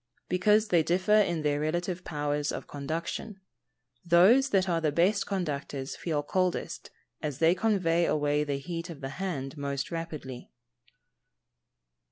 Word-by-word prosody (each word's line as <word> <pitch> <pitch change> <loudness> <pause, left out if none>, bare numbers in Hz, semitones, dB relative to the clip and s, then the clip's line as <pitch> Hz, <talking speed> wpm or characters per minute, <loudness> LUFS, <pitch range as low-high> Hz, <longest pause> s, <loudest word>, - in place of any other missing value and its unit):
_ - - -47
Because 210 +4 +3
they 170 -2 +4
differ 180 +5 0
in 175 -7 +3
their 145 -1 +1
relative 175 +4 -2
powers 145 -2 -2
of - - -5
conduction. 165 +8 -5 0.6
Those 195 +11 +5
that 190 -4 +2
are 170 -2 +1
the 155 -2 +1
best 185 +7 +2
conductors 145 -7 -3
feel 155 -4 -2
coldest, 185 +3 -2 0.3
as 150 -4 -3
they 165 +3 +4
convey 180 -5 +1
away 150 0 +1
the 145 -2 -2
heat 165 +5 -5
of 155 -4 -9
the 135 - -4
hand 140 -4 -4
most 140 +1 -3
rapidly. 155 -7 -6
165 Hz, 145 wpm, -29 LUFS, 145-185 Hz, 0.6 s, Those